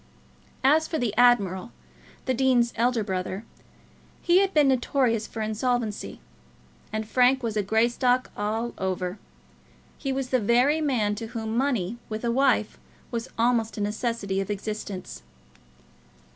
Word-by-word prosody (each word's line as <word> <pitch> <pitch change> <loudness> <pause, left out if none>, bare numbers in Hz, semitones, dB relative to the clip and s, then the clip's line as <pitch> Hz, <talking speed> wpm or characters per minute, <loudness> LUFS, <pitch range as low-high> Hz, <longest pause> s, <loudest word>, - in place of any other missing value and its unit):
As 310 +4 +4
for 320 - -2
the 240 -7 -1
admiral, 205 -7 +3 0.5
the 260 - +1
dean's 250 -2 +2
elder 235 -1 +1
brother, 190 +1 -3 0.8
he 355 +1 +5
had 390 -1 +2
been 300 -4 +4
notorious 245 -3 +1
for 220 - -5
insolvency; 220 0 -2 0.7
and 215 0 -3
Frank 255 +2 +3
was 225 -2 -2
a 210 - +2
Greystock 240 +4 +1
all 220 +3 -2
over. 185 0 -2 0.8
He 270 - -2
was 265 -1 -2
the 255 - +2
very 245 +8 +3
man 240 -9 +1
to 225 +2 -5
whom 225 -1 -4
money 240 -5 0
with 215 +2 -4
a 235 - +1
wife 255 -4 +2 0.3
was 235 +1 -4
almost 230 -2 +1
a - - -2
necessity 210 -2 -1
of 195 - -5
existence. 205 - -5
230 Hz, 140 wpm, -26 LUFS, 210-255 Hz, 0.8 s, he